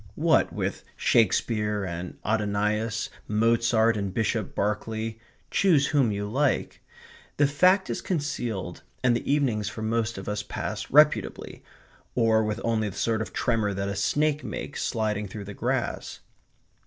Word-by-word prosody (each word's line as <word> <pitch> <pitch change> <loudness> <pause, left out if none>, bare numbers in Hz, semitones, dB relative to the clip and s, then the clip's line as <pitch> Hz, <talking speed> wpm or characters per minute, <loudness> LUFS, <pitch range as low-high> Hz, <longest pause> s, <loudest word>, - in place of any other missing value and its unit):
What - - +3
with - - -3
Shakespeare 105 -1 +2
and 90 0 -6
Adonais, 105 +1 0 0.2
Mozart 115 +1 +3
and 100 -2 -2
Bishop 110 0 -1
Berkeley 110 +2 -2 0.3
choose 165 -8 +4
whom 135 -7 +3
you 100 0 -3
like 135 +5 0 0.6
the 145 - +5
fact 185 +7 +4
is - - -3
concealed 120 - -3 0.2
and 125 -2 +4
the 120 - -2
evenings 120 -8 +1
for 110 +1 -6
most 115 0 -1
of 95 - -7
us 105 0 -1
pass 100 - -5
reputably, - - +3 0.5
or 110 -2 +3
with 105 +1 -2
only 110 -2 0
the 95 - -10
sort 110 -1 0
of 110 - -5
tremor 110 -5 0
that 100 +1 -2
a 100 - -3
snake 150 +9 +1
makes 145 - -5
sliding 105 -3 -1
through 100 +1 -7
the 100 - -7
grass. - - -2
110 Hz, 145 wpm, -26 LUFS, 105-120 Hz, 0.6 s, the